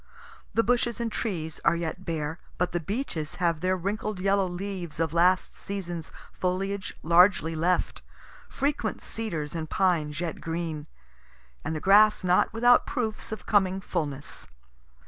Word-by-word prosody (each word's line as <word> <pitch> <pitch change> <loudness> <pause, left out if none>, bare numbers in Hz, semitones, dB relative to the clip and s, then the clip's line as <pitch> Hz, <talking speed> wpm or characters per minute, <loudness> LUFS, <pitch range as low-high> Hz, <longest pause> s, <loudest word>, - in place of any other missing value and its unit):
The 230 - +4
bushes 240 -1 +1
and 230 -1 -1
trees 165 -9 -3
are - - +4
yet 170 +2 -4
bare, 160 -1 -3 0.2
but 180 - 0
the 175 - 0
beeches 165 - -3
have 170 -3 +1
their 185 +2 +1
wrinkled 205 +2 -3
yellow 195 0 +2
leaves 180 -3 -5
of 165 -1 0
last 180 +2 +3
season's 175 -5 -5 0.2
foliage 195 +2 -2
largely 170 -1 +5
left, 175 +3 0 0.5
frequent 285 +2 -1
cedars 165 -10 -4
and 160 -2 -4
pines 165 -6 +1
yet 170 -2 -3
green, 165 -2 -3 0.8
and 160 - -2
the - - -2
grass 210 +4 +6
not 180 0 +3
without 245 +2 +5
proofs 220 -3 -3
of 220 - -6
coming 190 -2 +3
fullness. 150 -7 -4
180 Hz, 145 wpm, -27 LUFS, 165-200 Hz, 0.8 s, grass